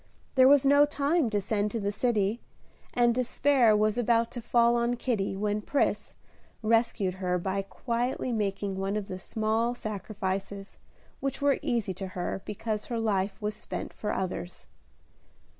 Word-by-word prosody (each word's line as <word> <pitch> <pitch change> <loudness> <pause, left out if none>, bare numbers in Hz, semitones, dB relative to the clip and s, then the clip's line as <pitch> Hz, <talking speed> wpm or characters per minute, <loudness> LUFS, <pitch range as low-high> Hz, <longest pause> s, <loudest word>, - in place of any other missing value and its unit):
There 260 -1 +6
was 280 0 +6
no 285 +1 +6
time 295 -1 +1
to 210 -1 0
send 205 +1 0
to 230 - -3
the 200 -1 -1
city, 215 -1 0 0.5
and 240 -2 +3
despair 250 -2 +3
was 215 +2 +1
about 235 -1 +2
to 245 - -6
fall 235 0 +3
on 235 +1 +1
Kitty, 220 -6 -1
when 210 +1 -1
Pris 280 +6 -1 0.5
rescued 225 -4 +2
her 180 -1 +1
by 190 +2 -1
quietly 240 +5 -2
making 200 -3 -2
one 195 +2 -1
of 205 -2 -4
the 185 - -6
small 220 +4 0
sacrifices 200 -2 -5 0.4
which 275 -1 -3
were 285 -1 +2
easy 230 -6 -1
to 190 +1 -6
her 180 +2 -2
because 210 0 -3
her 235 - -2
life 200 -3 0
was 210 0 -2
spent - - -6
for 210 - -3
others. 185 -1 -4
215 Hz, 160 wpm, -28 LUFS, 195-240 Hz, 0.5 s, There